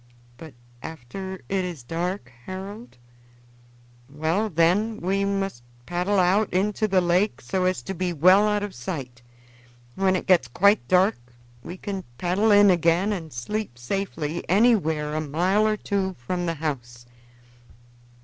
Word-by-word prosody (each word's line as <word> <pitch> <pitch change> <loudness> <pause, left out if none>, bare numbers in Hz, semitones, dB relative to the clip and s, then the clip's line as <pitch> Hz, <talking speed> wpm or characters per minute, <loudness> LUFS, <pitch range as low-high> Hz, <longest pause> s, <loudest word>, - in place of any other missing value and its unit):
"But 155 -2 -12 0.3
after 160 +6 -7
it 195 -1 0
is 175 -8 -6
dark, 165 0 -4 0.2
Harold?" 195 - -8 1.1
"Well, 160 +9 -1
then, 185 +6 +2
we 195 +2 0
must 195 -9 -2 0.2
paddle 180 +3 0
out 190 +3 +3
into 210 +4 +1
the 190 -2 +3
lake 175 - +1
so 185 +9 -2
as 185 -9 0
to 190 - -4
be 180 0 -2
well 185 +6 +5
out 210 -1 0
of 205 -2 -5
sight. 125 -2 -6 0.7
When 190 +2 +1
it 185 - -2
gets 175 -9 +4
quite 200 - +3
dark 185 - +3 0.4
we 175 +9 -8
can 195 0 -5
paddle 185 +5 +1
in 205 -1 +7
again 175 +4 +2
and 165 -5 -6
sleep 140 - -4
safely 160 +3 -3
anywhere 175 -8 +2
a 155 - -1
mile 180 +8 +1
or 215 0 +1
two 195 -2 -2
from 175 +8 -3
the 165 - -1
house." 120 -6 -5
185 Hz, 145 wpm, -24 LUFS, 160-200 Hz, 1.1 s, in